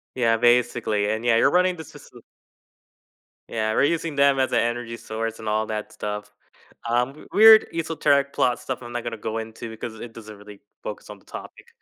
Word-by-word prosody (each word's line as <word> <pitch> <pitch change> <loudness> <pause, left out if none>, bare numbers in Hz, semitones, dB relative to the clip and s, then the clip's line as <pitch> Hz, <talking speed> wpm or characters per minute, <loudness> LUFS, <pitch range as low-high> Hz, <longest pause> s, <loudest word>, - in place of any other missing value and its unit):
Yeah, 115 -2 +2
basically, 120 -3 +2
and 110 +2 -3
yeah, 120 -1 +3
you're - - +4
running 180 0 +3
this 160 -3 -10
facil - - -15 1.3
Yeah, 110 -1 -1
we're - - +3
using 165 -1 -1
them 140 -1 +4
as 130 - +1
an - - +3
energy 120 0 -2
source 115 0 -5
and 110 - -8
all 110 +1 +1
that 105 -1 -5
stuff, 105 0 -5 0.6
um, 125 +5 -1
weird 220 +1 +8
esoteric 145 -4 +1
plot 125 -1 +1
stuff 130 -1 -5
I'm 120 - -9
not 120 -1 -4
gonna 120 -1 -5
go 110 +1 -4
into 110 +1 -6
because 110 0 -7
it 115 0 -9
doesn't 110 -2 -11
really 105 0 -14 0.2
focus - - -7
on - - -11
the - - -27
topic. - - -10
115 Hz, 195 wpm, -24 LUFS, 110-135 Hz, 1.3 s, weird